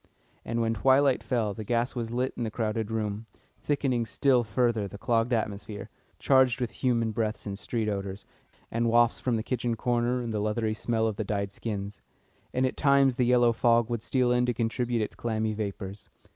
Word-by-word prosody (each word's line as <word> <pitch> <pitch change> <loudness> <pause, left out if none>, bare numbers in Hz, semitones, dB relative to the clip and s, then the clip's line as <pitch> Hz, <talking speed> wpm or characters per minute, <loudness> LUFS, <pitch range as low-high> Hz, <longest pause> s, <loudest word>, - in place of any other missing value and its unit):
And 115 0 -2
when 115 0 +1
twilight 130 +4 +3
fell 115 -5 -1
the 110 - -6
gas 120 +3 0
was 115 -3 -3
lit 125 +3 -1
in - - -6
the 110 - -1
crowded 110 -1 -2
room, 110 0 -3 0.3
thickening 130 -5 0
still 125 +4 +3
further 110 -1 0
the 100 - -9
clogged 115 +2 +1
atmosphere, 105 -2 -3 0.3
charged 130 -2 +3
with 125 -2 -2
human 115 -3 0
breaths 110 0 -2
and 100 -2 -4
street 110 +2 -3
odours, 100 -1 -4 0.5
and 115 +1 +1
wafts 120 0 +4
from 125 -2 0
the 110 - -1
kitchen 120 -1 -1
corner 120 +2 0
and 115 -2 -4
the 105 - -1
leathery 110 +1 0
smell 110 0 0
of 110 -2 -1
the 110 - -1
dyed 100 -1 -2
skins; 100 -1 -5 0.5
and 130 +1 +1
at 130 - -2
times 140 -2 +4
the 125 0 +1
yellow 120 -1 +4
fog 115 0 +3
would 120 -2 -1
steal 125 0 +1
in 125 0 +2
to 120 - 0
contribute 120 0 0
its - - -5
clammy 110 -2 -2
vapours. 100 -1 -5
115 Hz, 195 wpm, -28 LUFS, 110-125 Hz, 0.5 s, wafts